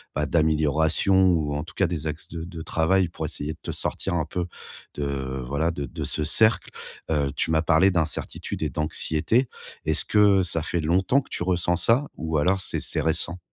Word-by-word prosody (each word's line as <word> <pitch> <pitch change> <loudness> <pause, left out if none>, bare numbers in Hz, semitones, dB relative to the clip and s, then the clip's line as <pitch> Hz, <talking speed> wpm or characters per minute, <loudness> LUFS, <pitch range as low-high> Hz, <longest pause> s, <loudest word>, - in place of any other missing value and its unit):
bah 75 0 0
d'amélioration 80 +3 +2 0.2
ou, 75 -4 0
en 75 - -2
tout - - -12
cas, 95 - +2
des 80 -2 -4
axes 75 +1 -6
de 85 -1 -6
de 85 -2 -8
travail 85 +3 +1
pour 80 -1 -5
essayer 75 0 -3
de - - -19
te - - -5
sortir 95 - -1
un 80 -3 0
peu 85 +2 -3 0.5
de 65 -2 -3
voilà, 80 +5 0
de 70 -3 -4
de - - -6
ce 75 - -1
cercle. 110 +8 +3 0.4
Heu, 70 -3 +1
tu 80 - -1
m'as 80 0 +3
parlé 85 +4 +4
d'incertitude 80 -3 -3
et - - 0
d'anxiété, 75 +3 -2 0.5
est-ce - - +1
que 100 -3 +4
ça 85 -2 -2
fait 85 +2 -2
longtemps 95 - +2
que - - -20
tu - - -5
ressens 90 -1 +1
ça 115 +10 +2
ou 80 -1 -2
alors 95 +6 +2
c'est - - +1
c'est 80 - -1
récent? 80 +3 0
80 Hz, 200 wpm, -25 LUFS, 75-90 Hz, 0.5 s, parlé